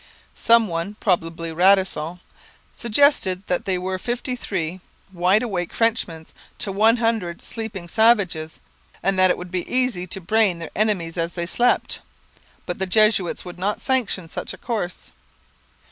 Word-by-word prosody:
Some 230 Hz, -1 st, +4 dB
one, 170 Hz, +4 st, -3 dB
probably 165 Hz, -3 st, -1 dB
Radisson, 180 Hz, -2 st, +2 dB, 0.5 s
suggested 225 Hz, -6 st, +2 dB
that 180 Hz, -, -1 dB
they 190 Hz, -2 st, 0 dB
were 185 Hz, +1 st, -3 dB
fifty 245 Hz, +3 st, -3 dB
three 185 Hz, -6 st, -4 dB, 0.3 s
wide 185 Hz, +5 st, +3 dB
awake 180 Hz, -7 st, -3 dB
Frenchmen 215 Hz, -8 st, 0 dB, 0.3 s
to 200 Hz, -, -3 dB
one 220 Hz, +4 st, +4 dB
hundred 220 Hz, -7 st, -1 dB
sleeping 215 Hz, -6 st, -6 dB
savages, 190 Hz, -7 st, +2 dB, 0.4 s
and 195 Hz, 0 st, +1 dB
that 185 Hz, 0 st, +6 dB
it -, -, +2 dB
would 180 Hz, 0 st, -8 dB
be 180 Hz, -2 st, -3 dB
easy 250 Hz, -8 st, +1 dB
to 190 Hz, -, -5 dB
brain 195 Hz, 0 st, +2 dB
their 165 Hz, -1 st, -7 dB
enemies 190 Hz, -6 st, 0 dB
as 165 Hz, +1 st, -1 dB
they 170 Hz, -1 st, -2 dB
slept; 240 Hz, +7 st, +1 dB, 0.6 s
but 175 Hz, -, -4 dB
the 190 Hz, -, 0 dB
Jesuits 215 Hz, -3 st, +2 dB
would 180 Hz, 0 st, -9 dB
not 205 Hz, +3 st, -1 dB
sanction 240 Hz, -10 st, -1 dB
such -, -, -5 dB
a -, -, -19 dB
course. 210 Hz, -7 st, -4 dB
190 Hz, 150 wpm, -22 LUFS, 175-220 Hz, 0.6 s, that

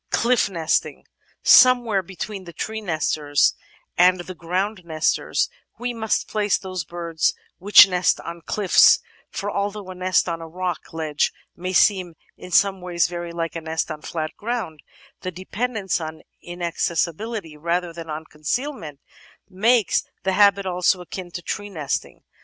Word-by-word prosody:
Cliff 240 Hz, -2 st, +2 dB
Nesting 165 Hz, -4 st, -1 dB, 0.4 s
Somewhere 245 Hz, -5 st, +6 dB
between 195 Hz, +2 st, -7 dB
the 170 Hz, -, -10 dB
tree 220 Hz, +6 st, -4 dB
nesters 155 Hz, -5 st, +1 dB, 0.5 s
and 180 Hz, 0 st, +5 dB
the 185 Hz, +1 st, -8 dB
ground 185 Hz, +4 st, -2 dB
nesters 160 Hz, -2 st, 0 dB, 0.3 s
we 245 Hz, 0 st, -3 dB
must 220 Hz, -2 st, -1 dB
place 210 Hz, -2 st, +1 dB
those 185 Hz, -3 st, -5 dB
birds 165 Hz, -1 st, -1 dB, 0.2 s
which 205 Hz, +2 st, +9 dB
nest 180 Hz, -2 st, +1 dB
on 170 Hz, 0 st, -8 dB
cliffs, 200 Hz, +2 st, +5 dB, 0.3 s
for 205 Hz, 0 st, -4 dB
although 200 Hz, -1 st, -3 dB
a -, -, -6 dB
nest 185 Hz, 0 st, +1 dB
on 165 Hz, -1 st, -3 dB
a 165 Hz, -, -7 dB
rock 180 Hz, 0 st, -4 dB
ledge 155 Hz, -2 st, 0 dB, 0.2 s
may 185 Hz, +1 st, -4 dB
seem 185 Hz, -3 st, +3 dB, 0.2 s
in 180 Hz, -, -11 dB
some 190 Hz, +1 st, +3 dB
ways 175 Hz, -1 st, +1 dB
very 175 Hz, 0 st, -6 dB
like 165 Hz, -1 st, -4 dB
a 165 Hz, -, -4 dB
nest 160 Hz, 0 st, -2 dB
on 155 Hz, -1 st, -6 dB
flat 155 Hz, -1 st, -4 dB
ground, 215 Hz, -9 st, -4 dB, 0.4 s
the 185 Hz, -, -4 dB
dependence 195 Hz, +2 st, -3 dB
on 160 Hz, 0 st, -7 dB, 0.2 s
inaccessibility 175 Hz, +2 st, -3 dB
rather 170 Hz, +2 st, -2 dB
than 165 Hz, -1 st, -9 dB
on 155 Hz, +1 st, -5 dB
con 150 Hz, -1 st, -21 dB
cealment 210 Hz, -, -3 dB, 0.5 s
makes 220 Hz, +3 st, +3 dB, 0.2 s
the 190 Hz, -, 0 dB
habit 200 Hz, 0 st, +4 dB
also 180 Hz, 0 st, +1 dB
akin 180 Hz, +1 st, -7 dB
to 175 Hz, 0 st, -7 dB
tree 205 Hz, +4 st, -4 dB
nesting. 155 Hz, -8 st, -4 dB
180 Hz, 150 wpm, -23 LUFS, 165-200 Hz, 0.5 s, which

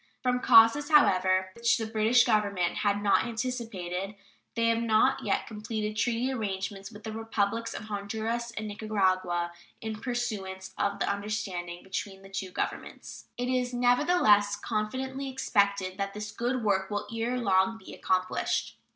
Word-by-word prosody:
From 250 Hz, -1 st, +2 dB
causes, 245 Hz, +5 st, +6 dB
however, 185 Hz, -10 st, +4 dB
which 235 Hz, +2 st, +2 dB
the 225 Hz, -, -3 dB
British 220 Hz, +2 st, +4 dB
Government 200 Hz, -6 st, +1 dB
had 205 Hz, -1 st, 0 dB
not 200 Hz, -1 st, +4 dB
anticipated, 220 Hz, -6 st, -4 dB, 0.4 s
they 230 Hz, -1 st, +1 dB
have 230 Hz, 0 st, +2 dB
not 230 Hz, +4 st, +3 dB
yet -, -, 0 dB
completed 215 Hz, 0 st, -4 dB
treaty 240 Hz, +3 st, 0 dB
arrangements 195 Hz, -3 st, -4 dB
with 210 Hz, -1 st, -12 dB
the 220 Hz, -, -5 dB
Republics 225 Hz, 0 st, -2 dB
of -, -, -6 dB
Honduras 220 Hz, +3 st, -3 dB
and 220 Hz, -2 st, -5 dB
Nicaragua, 185 Hz, -5 st, 0 dB, 0.3 s
in 220 Hz, -1 st, -5 dB
pursuance 195 Hz, -7 st, -4 dB
of 200 Hz, 0 st, -1 dB
the -, -, -1 dB
understanding 200 Hz, -4 st, -3 dB
between 195 Hz, 0 st, -5 dB
the 195 Hz, -, -13 dB
two 195 Hz, -1 st, -4 dB
Governments. -, -, -5 dB
It 245 Hz, -, -2 dB
is, 250 Hz, -1 st, 0 dB
nevertheless, 245 Hz, -, +4 dB
confidently 260 Hz, +6 st, -3 dB
expected 200 Hz, -7 st, 0 dB
that 200 Hz, 0 st, -3 dB
this 210 Hz, 0 st, -5 dB
good 245 Hz, +2 st, -2 dB
work 195 Hz, -2 st, +1 dB
will 205 Hz, -1 st, -2 dB
ere 235 Hz, +2 st, -1 dB
long 200 Hz, -1 st, +2 dB
be 190 Hz, -, -12 dB
accomplished. 185 Hz, 0 st, -1 dB
215 Hz, 150 wpm, -28 LUFS, 195-235 Hz, 0.4 s, causes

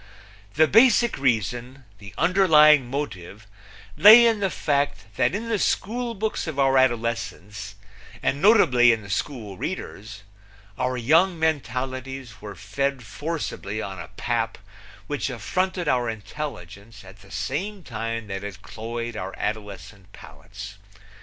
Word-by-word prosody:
The 155 Hz, +2 st, +5 dB
basic 235 Hz, +2 st, +5 dB
reason, 120 Hz, +1 st, -1 dB
the 100 Hz, -2 st, -12 dB
underlying 155 Hz, -7 st, +5 dB
motive, 110 Hz, -7 st, -6 dB, 0.5 s
lay 220 Hz, +4 st, +9 dB
in 225 Hz, -2 st, +3 dB
the 195 Hz, -1 st, 0 dB
fact 140 Hz, -, -1 dB
that -, -, +1 dB
in 225 Hz, +3 st, -4 dB
the 225 Hz, -3 st, 0 dB
schoolbooks 220 Hz, -2 st, -2 dB
of 155 Hz, -3 st, -5 dB
our 135 Hz, -1 st, +3 dB
adolescence, 110 Hz, -5 st, -2 dB, 0.5 s
and 140 Hz, +2 st, 0 dB
notably 130 Hz, -, +6 dB
in 110 Hz, -2 st, -1 dB
the 100 Hz, -, -8 dB
school 105 Hz, -4 st, -4 dB
readers, 105 Hz, -1 st, -6 dB, 0.5 s
our 125 Hz, +2 st, -1 dB
young 165 Hz, +9 st, +3 dB
mentalities 130 Hz, -5 st, -3 dB
were 105 Hz, -1 st, -8 dB
fed 135 Hz, +7 st, -3 dB
forcibly 145 Hz, -6 st, -5 dB
on 95 Hz, -3 st, -6 dB
a 85 Hz, -, -7 dB
pap 115 Hz, -2 st, -1 dB, 0.5 s
which 145 Hz, +3 st, -3 dB
affronted 180 Hz, -, -2 dB
our 125 Hz, -4 st, +1 dB
intelligence 105 Hz, -, -8 dB
at 95 Hz, +2 st, -15 dB
the 100 Hz, -, -17 dB
same 150 Hz, -, -4 dB
time 115 Hz, -2 st, -4 dB
that 95 Hz, -1 st, -6 dB
it 100 Hz, -1 st, -8 dB
cloyed 115 Hz, +1 st, -6 dB
our 95 Hz, -2 st, -5 dB
adolescent 105 Hz, -2 st, -6 dB
palates. 100 Hz, -, -11 dB
125 Hz, 130 wpm, -24 LUFS, 105-155 Hz, 0.5 s, lay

